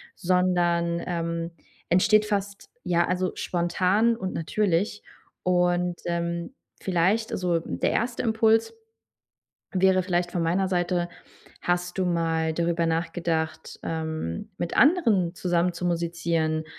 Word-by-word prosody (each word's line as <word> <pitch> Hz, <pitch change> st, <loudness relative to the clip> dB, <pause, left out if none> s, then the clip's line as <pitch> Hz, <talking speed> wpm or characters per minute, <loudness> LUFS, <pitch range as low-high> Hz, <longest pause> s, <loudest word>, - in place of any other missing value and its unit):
sondern, 175 Hz, -2 st, +1 dB
ähm, 170 Hz, -1 st, -2 dB, 0.4 s
entsteht 210 Hz, +4 st, +4 dB
fast, 200 Hz, -1 st, -3 dB
ja, 175 Hz, -1 st, +2 dB
also, 185 Hz, 0 st, 0 dB
spontan 185 Hz, +6 st, +1 dB
und 190 Hz, -5 st, -4 dB
natürlich 200 Hz, +3 st, 0 dB, 0.4 s
und, 180 Hz, -1 st, +2 dB
ähm, 170 Hz, +5 st, -2 dB, 0.3 s
vielleicht 190 Hz, +5 st, +1 dB
also, 175 Hz, -2 st, 0 dB
der -, -, -1 dB
1. 235 Hz, +1 st, -1 dB
Impuls 225 Hz, -, +3 dB, 1.0 s
wäre 190 Hz, 0 st, +3 dB
vielleicht 175 Hz, -1 st, -1 dB
von 175 Hz, -, 0 dB
meiner 180 Hz, +4 st, +1 dB
Seite, 175 Hz, -1 st, 0 dB, 0.5 s
hast 175 Hz, +1 st, -1 dB
du 185 Hz, -, +1 dB
mal 165 Hz, -2 st, 0 dB
darüber 170 Hz, 0 st, 0 dB
nachgedacht, 165 Hz, -1 st, -2 dB
ähm, 160 Hz, -, -4 dB
mit 170 Hz, -, -3 dB
anderen 225 Hz, -, +4 dB
zusammen 175 Hz, 0 st, +1 dB
zu 180 Hz, -, -5 dB
musizieren 165 Hz, -2 st, 0 dB
175 Hz, 115 wpm, -26 LUFS, 170-185 Hz, 1.0 s, entsteht